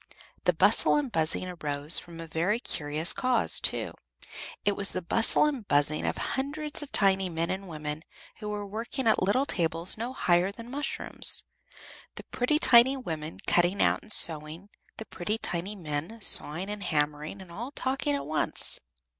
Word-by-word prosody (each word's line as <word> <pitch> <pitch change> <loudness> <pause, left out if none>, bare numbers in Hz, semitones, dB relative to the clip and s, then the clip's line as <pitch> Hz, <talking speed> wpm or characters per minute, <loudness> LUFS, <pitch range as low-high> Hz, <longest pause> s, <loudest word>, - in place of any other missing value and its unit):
The - - +4
bustle - - +5
and 285 -4 -1
buzzing 160 0 0
arose 150 -3 +2
from 170 -1 -12
a 165 - -6
very 170 +8 -1
curious 155 - 0
cause, 255 -3 +1
too, - - 0 0.7
it 205 - +2
was 200 -1 +3
the 185 - -4
bustle 225 - +4
and 275 -8 -3
buzz 145 +1 +2
of 150 - -2
hundreds 295 +3 -2
of 295 - -9
tiny 195 -1 +2
men 165 0 -2
and 190 +1 -5
women 150 -1 -5 0.4
who 210 -1 -6
were 205 -1 -4
working 230 +6 -5
at 220 - +3
little 205 +9 +2
tables 170 - -1
no 235 +3 -3
higher 180 -6 +1
than 230 +3 -11
mushrooms, 290 +2 +2 0.7
the - - -8
pretty 255 +5 0
tiny 260 -2 +6
women 160 -10 -6
cutting 175 +3 +2
out - - +2
and 215 - -11
sewing, 160 +2 -1 0.3
the 220 - -6
pretty 210 +3 -3
tiny 190 0 -4
men 160 +4 -5
sawing 175 -2 -1
and 210 0 -6
hammering 150 +2 -2
and 185 -2 -12
all 235 +9 -6
talking 260 - -2
at 140 0 -4
once. 155 +1 +1
190 Hz, 170 wpm, -28 LUFS, 160-230 Hz, 0.7 s, tiny